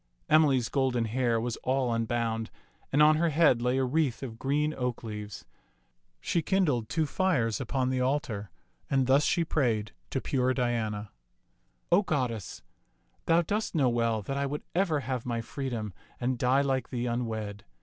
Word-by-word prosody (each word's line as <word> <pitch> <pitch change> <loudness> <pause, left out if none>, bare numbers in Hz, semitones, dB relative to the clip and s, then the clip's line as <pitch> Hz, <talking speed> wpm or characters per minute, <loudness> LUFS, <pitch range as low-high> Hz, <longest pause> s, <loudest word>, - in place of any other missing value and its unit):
Emily's 140 -6 +4
golden 130 -4 +1
hair 120 0 +1
was 120 0 -3
all 130 -2 0
unbound, 115 -1 -1 0.4
and 145 +2 +5
on 155 0 +6
her 170 +1 +2
head 150 -6 +4
lay 125 +2 +1
a 135 - +2
wreath 140 -1 0
of 115 -3 -7
green 150 +3 0
oak 125 -3 -3
leaves. 105 -3 -7 0.7
She 170 - 0
kindled 150 - +1
two 160 -1 +1
fires 135 - 0
upon 130 -1 -1
the 130 -1 0
altar, 125 -7 -1 0.4
and 135 -1 +2
thus 135 +3 +4
she 170 +3 +2
prayed 115 -9 0 0.2
to 135 - -1
pure 130 -1 0
Diana, 110 -4 -1 0.8
O 175 +4 +6
goddess, 125 - -3 0.6
thou 165 +1 +4
dost 210 +3 -2
know 135 -5 +3
well 115 -2 0
that 135 +7 -3
I 140 0 0
would 145 +2 -4
ever 170 -5 +1
have 130 -1 -3
my 120 -2 -2
free 135 +4 -4
dom 110 -5 -4 0.3
and 125 0 -1
die 130 +3 +3
like 135 -2 -1
thee 125 -2 -2
unwed. 110 -4 -3
130 Hz, 170 wpm, -29 LUFS, 115-145 Hz, 0.8 s, on